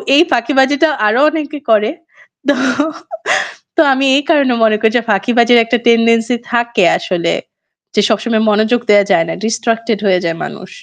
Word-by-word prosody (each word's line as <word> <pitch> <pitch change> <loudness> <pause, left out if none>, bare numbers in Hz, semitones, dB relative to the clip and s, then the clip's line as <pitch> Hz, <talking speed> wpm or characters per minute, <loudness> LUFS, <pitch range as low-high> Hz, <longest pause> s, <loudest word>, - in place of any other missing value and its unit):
এই 315 - +6
ফাঁকিবাজিটাও 285 +5 +1
আরও 230 +5 +1
অনেকে 305 -2 -5
করে। 215 -1 +2 0.6
তো, 285 - +3 1.2
তো 330 - +3
আমি 270 +1 -1
এই 290 - +1
কারণে 280 -6 +2
মনে 215 -1 +3
করি 225 0 +1
যে - - 0
ফাঁকিবাজির 235 +4 +2
একটা 245 +1 0
টেন্ডেন্সি 230 +1 +2 0.2
থাকে 235 -4 0
আসলে, 170 -3 -2 0.6
যে 210 - +3
সবসময় 220 +1 0
মনোযোগ 220 +3 +1
দেয়া 205 -1 +5
যায় 165 - +2
না, - - -3
ডিস্ট্রাক্টেড 225 -1 -2
হয়ে 185 -2 +2
যায় 165 0 -2
মানুষ। - - -10
230 Hz, 155 wpm, -14 LUFS, 215-260 Hz, 1.2 s, এই